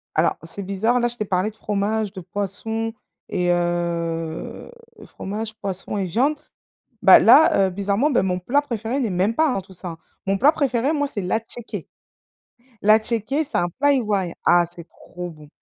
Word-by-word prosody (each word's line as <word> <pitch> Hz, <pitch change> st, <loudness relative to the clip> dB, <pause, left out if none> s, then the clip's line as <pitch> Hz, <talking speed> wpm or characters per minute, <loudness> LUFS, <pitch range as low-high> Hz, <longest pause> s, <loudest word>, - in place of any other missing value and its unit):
Alors, -, -, +2 dB
c'est 185 Hz, +5 st, -7 dB
bizarre, 205 Hz, +6 st, +1 dB
là, 240 Hz, -, +2 dB
je 240 Hz, -, -4 dB
t'ai 215 Hz, -, -2 dB
parlé 190 Hz, +1 st, 0 dB
de 220 Hz, -, -27 dB
fromage, 210 Hz, 0 st, -1 dB
de 190 Hz, -, -7 dB
poisson 220 Hz, +4 st, -3 dB, 0.4 s
et 180 Hz, 0 st, +1 dB
heu, 170 Hz, -, -2 dB, 0.3 s
fromage, 215 Hz, +3 st, -5 dB
poisson 195 Hz, 0 st, -4 dB
et 195 Hz, -, 0 dB
viande. 260 Hz, -, +1 dB, 0.7 s
Bah, -, -, +9 dB
là 200 Hz, -10 st, +6 dB
heu, -, -, -4 dB
bizarrement, 200 Hz, +9 st, 0 dB
beh, 245 Hz, -, +3 dB
mon 180 Hz, -1 st, 0 dB
plat 255 Hz, +11 st, +1 dB
préféré 235 Hz, -2 st, -3 dB
n'est 230 Hz, -6 st, 0 dB
même 185 Hz, +5 st, +1 dB
pas 315 Hz, 0 st, +3 dB
dans 195 Hz, -, -1 dB
tout 190 Hz, +1 st, -16 dB
ça. 175 Hz, -2 st, -7 dB, 0.3 s
Mon 195 Hz, 0 st, +1 dB
plat 290 Hz, +5 st, +5 dB
préféré 275 Hz, -2 st, 0 dB
moi, 290 Hz, -2 st, 0 dB
c'est 205 Hz, -, -4 dB
l'attiéké. 225 Hz, +5 st, -4 dB, 0.9 s
L'attiéké 220 Hz, +7 st, +2 dB
c'est -, -, -4 dB
un 175 Hz, 0 st, +1 dB
plat 285 Hz, 0 st, +5 dB
ivoirien. 205 Hz, -9 st, 0 dB
Ah, 175 Hz, 0 st, +6 dB
c'est 170 Hz, 0 st, -11 dB
trop 180 Hz, 0 st, -9 dB
bon. 155 Hz, -2 st, -14 dB
205 Hz, 175 wpm, -22 LUFS, 180-235 Hz, 0.9 s, Bah